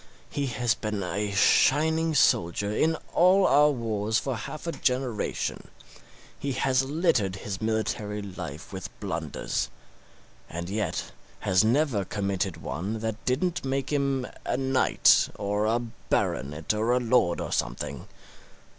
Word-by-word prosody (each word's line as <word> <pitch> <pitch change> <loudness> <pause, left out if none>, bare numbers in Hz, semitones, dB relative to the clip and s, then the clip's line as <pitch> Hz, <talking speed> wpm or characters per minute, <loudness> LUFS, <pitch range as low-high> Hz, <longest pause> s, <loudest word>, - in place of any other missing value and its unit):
He 140 -1 -1
has 120 -1 +1
been 105 -2 -3
a 100 +4 -2
shining 160 +10 +3
soldier 100 -3 +2
in 160 +6 +2 0.2
all 185 +2 +5
our 150 +2 +6
wars 110 -5 -1
for 135 0 -1
half 150 +8 -7
a 170 - -1
generation; 125 -7 -2 0.7
he 140 -1 -2
has 130 0 +2
littered 135 - +1
his 95 0 -6
military 110 -1 -1
life 90 -5 -7
with 95 -1 -5
blunders, - - -3 0.8
and 85 +2 -5
yet 105 -4 -2 0.3
has 95 0 +3
never 120 -2 +2
committed 95 -2 -2
one 95 +6 -4
that 110 0 -3
didn't 165 +8 0
make 135 +1 -2
him 140 -2 +1 0.2
a - - -1
knight 130 0 +4
or 105 +1 -1
a 115 +2 +2
baronet 80 - -2
or 110 +3 +1
a 125 - +3
lord 120 -8 +2
or - - -4
something. 60 +1 -3
110 Hz, 135 wpm, -27 LUFS, 100-135 Hz, 0.8 s, our